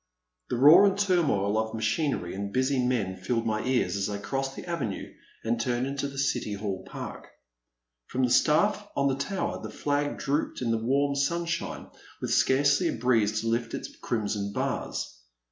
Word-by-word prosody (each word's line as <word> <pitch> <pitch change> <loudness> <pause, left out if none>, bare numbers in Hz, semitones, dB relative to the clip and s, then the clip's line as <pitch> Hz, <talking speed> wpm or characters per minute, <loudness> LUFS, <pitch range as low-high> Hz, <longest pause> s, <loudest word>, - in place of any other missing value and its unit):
*' - - -53
The - - 0
roar 160 +10 +8
and 195 0 +1
turmoil 155 - +2
of 110 0 -2
machinery 110 - -1
and 100 +1 -4
busy 130 +2 +1
men 110 -7 0
filled 115 +5 -1
my 110 -1 0
ears 120 -8 +1
as 100 +1 -1
I 100 - -3
crossed 135 +6 -3
the - - -8
avenue 145 - -4 0.3
and 115 +1 0
turned 120 +1 0
into 140 +1 -2
the 140 0 -9
City 125 -6 0
Hall 100 -2 -4
Park. - - -7 0.8
From 130 - -1
the 125 - +2
staflF 205 +10 +3
on 140 0 +2
the 135 - +1
tower 195 +1 -3
the - - -6
flag 145 0 -1
drooped 145 +3 -1
in 120 -2 -1
the 115 -1 0
warm 140 +3 +2
sunshine 170 +4 -1 0.3
with - - -3
scarcely 140 +1 +3
a - - 0
breeze 110 -3 +2
to 115 - -4
lift 115 +1 -1
its - - -7
crimson 105 -3 -2
bars. - - -3
125 Hz, 180 wpm, -28 LUFS, 110-140 Hz, 0.8 s, roar